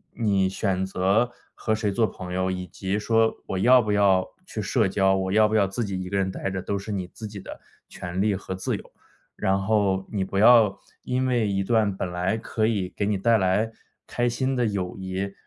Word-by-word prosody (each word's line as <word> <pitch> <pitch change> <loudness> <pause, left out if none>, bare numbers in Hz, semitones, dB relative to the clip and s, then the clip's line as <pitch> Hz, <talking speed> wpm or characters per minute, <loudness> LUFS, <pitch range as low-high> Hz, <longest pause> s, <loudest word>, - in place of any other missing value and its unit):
你 100 -5 +1
选 95 -1 -1
择 95 +6 +1 0.2
和 110 - -1
谁 110 -2 -1
做 110 +3 +2
朋 90 -3 -8
友， 95 0 0
以 90 0 -4
及 95 +2 -3
说 110 +1 +2 0.2
我 95 - -2
要 125 +6 +6
不 110 -2 -2
要 100 -2 +3 0.2
去 110 - -6
社 105 +2 +1
交、 95 0 +2
我 95 0 -1
要 110 +1 +5
不 110 - -4
要 100 -3 +4
自 105 +4 -3
己 95 -2 -3
一 90 - -6
个 100 - -1
人 95 -1 0
呆 95 - -3
着， 95 0 -3
都 100 +2 -2
是 100 +2 -7
你 95 -3 -2
自 110 +4 -9
己 105 -1 -8
的 - - -9 0.3
权 90 +1 -6
利 105 -1 +2
和 95 0 -5
自 95 - -2
由。 - - -10 0.4
然 95 +1 0
后 95 -2 +1
你 100 -3 -1
不 95 +1 -4
要 110 -3 +6 0.2
因 130 +1 0
为 120 -4 +1
一 100 -1 0
段 105 -2 +1
本 95 - -3
来 90 +3 0
可 110 -1 -1
以 100 -5 -1
给 100 - 0
你 105 0 +1
带 115 +4 +3
来 100 +3 +1 0.4
开 120 - 0
心 130 +3 -1
的 125 -1 +1
友 95 -4 -2
谊， 95 +1 -4
100 Hz, 240 characters per minute, -25 LUFS, 95-110 Hz, 0.4 s, 要